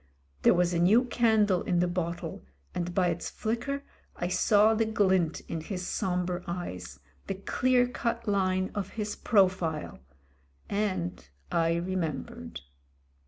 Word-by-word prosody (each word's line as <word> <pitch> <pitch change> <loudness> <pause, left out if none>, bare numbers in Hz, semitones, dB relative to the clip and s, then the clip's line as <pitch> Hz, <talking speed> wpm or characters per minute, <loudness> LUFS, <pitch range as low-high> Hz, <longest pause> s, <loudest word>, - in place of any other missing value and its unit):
There - - +5
was 180 0 +2
a 170 - +1
new 205 +8 +5
candle 220 -6 +3
in 180 - 0
the 180 - +3
bottle, 175 -1 -3 0.3
and 175 0 -2
by 180 0 +2
its 170 0 -3
flicker 255 +6 -3 0.3
I 175 - -2
saw 210 +3 +4
the 225 0 +2
glint 190 -6 +2
in 165 - -5
his 180 +2 -5
sombre 180 -2 -1
eyes, 90 - -5 0.3
the 195 - -2
clear 250 +5 +2
cut 235 -2 -3
line 185 -2 +1
of 200 -2 -3
his 210 -1 -2
profile. 185 -7 +1 0.7
And 90 - -2 0.2
I 165 0 +2
remembered. 170 -5 -3
185 Hz, 135 wpm, -29 LUFS, 175-210 Hz, 0.7 s, There